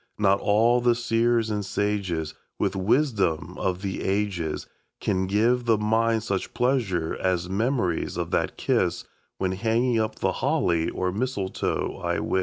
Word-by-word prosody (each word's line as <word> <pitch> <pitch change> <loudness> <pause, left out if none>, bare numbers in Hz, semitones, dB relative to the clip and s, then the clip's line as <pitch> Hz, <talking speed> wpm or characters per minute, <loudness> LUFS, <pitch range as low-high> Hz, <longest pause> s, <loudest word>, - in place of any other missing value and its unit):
Not 100 -2 +3
all 115 +4 +3
the 120 -1 +3
seers 115 -1 +1
and 105 -1 -1
sages 95 -6 -1 0.2
With - - 0
wisdom 100 - +1
of 95 +1 -1
the 95 -1 -3
ages 95 -5 -1 0.3
Can 95 -2 0
give 115 +5 +2
the 115 -2 +4
mind 110 +1 +1
such 100 -4 -3
pleasure 115 -10 0
as 90 -2 0
memories 100 -3 -1
of - - -3
that - - 0
kiss - - 0 0.3
When 95 -1 0
hanging 115 +4 +1
up 110 0 -1
the 95 - 0
holly 90 - +1
or 90 0 -2
mistletoe, 100 -3 -2
I - - -1
wis. 95 - 0
105 Hz, 150 wpm, -25 LUFS, 95-115 Hz, 0.3 s, the